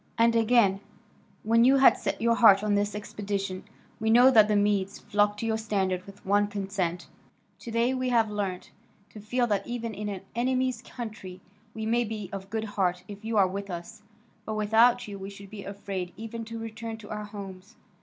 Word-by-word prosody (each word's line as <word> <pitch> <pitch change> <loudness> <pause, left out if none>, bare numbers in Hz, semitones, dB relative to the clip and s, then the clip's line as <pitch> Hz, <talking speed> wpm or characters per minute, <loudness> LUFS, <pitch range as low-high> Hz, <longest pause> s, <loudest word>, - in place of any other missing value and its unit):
And 230 0 +4
again, 225 -4 +4 0.6
when 230 +2 +4
you 265 +3 +6
had 270 - +7
set - - -3
your 230 +1 +3
heart 210 -4 +6
on 210 -1 +1
this 205 +1 0
expedition, 200 -2 -4 0.4
we 220 0 0
know 245 +3 +7
that 215 -4 +6
the 210 - +1
Medes 205 -1 +1
flocked 205 0 0
to - - -2
your 220 -1 0
standard 190 -4 -1
with 200 0 -14
one 205 +1 +3
consent. 195 -4 -3 0.5
To - - -9
day 230 +3 +1
we 255 -1 -1
have 230 -2 +3
learnt 195 -3 -4 0.4
to 215 - -10
feel 240 +4 0
that 205 -4 -1
even 235 -2 -4
in 210 +1 -4
an 195 -2 -5
enemy's 255 0 0
country 215 -8 -8 0.4
we 220 -1 -4
may 235 +2 +2
be 210 -4 -6
of 195 0 -6
good 220 +1 -2
heart 185 -4 -1
if 205 +1 -10
you 225 0 -1
are 195 -2 +5
with 200 +2 -5
us, 185 +5 -7 0.4
but, 215 - -4
without 225 +3 +3
you, 200 -1 -7
we 195 +1 -6
should 200 -1 -12
be 210 -2 -8
afraid 195 -3 -5
even 225 +1 -6
to 230 +1 -7
return 225 0 -6
to 215 -2 -12
our 210 0 -4
homes. 200 0 -10
210 Hz, 200 wpm, -27 LUFS, 200-230 Hz, 0.6 s, had